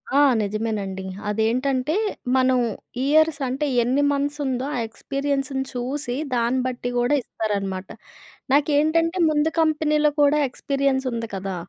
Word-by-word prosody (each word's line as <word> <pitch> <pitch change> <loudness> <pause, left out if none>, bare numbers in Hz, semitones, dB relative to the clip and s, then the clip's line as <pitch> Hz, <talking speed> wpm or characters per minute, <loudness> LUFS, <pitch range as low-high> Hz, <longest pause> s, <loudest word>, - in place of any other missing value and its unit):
ఆ! - - +6 0.2
నిజమేనండి 205 -2 -3 0.3
అదేంటంటే, 255 +6 0 0.4
మనం 260 -1 +3 0.5
ఇయర్స్ 310 +1 +3
అంటే, 270 +4 -1 0.2
ఎన్ని 260 +4 +1
మంత్స్ 285 +1 -1
ఉందో 260 -1 -1
ఆ - - -1
ఎక్స్‌పీరియన్స్‌ని 275 +3 -2
చూసి, 250 +1 -3 0.2
దాన్ని 240 +2 +1
బట్టి 245 -1 -3
గూడా 245 +4 +2
ఇస్తారనమాట. 195 -5 -3 0.6
నాకేంటంటే 315 +4 +2
ముందు 300 +1 +2
కంపెనీలో 305 -1 +2
కూడా 290 +1 +4
ఎక్స్‌పీరియన్స్‌ 275 0 -1
ఉంది 230 -1 -3
కదా! 195 0 -4
265 Hz, 120 wpm, -23 LUFS, 235-290 Hz, 0.6 s, ఆ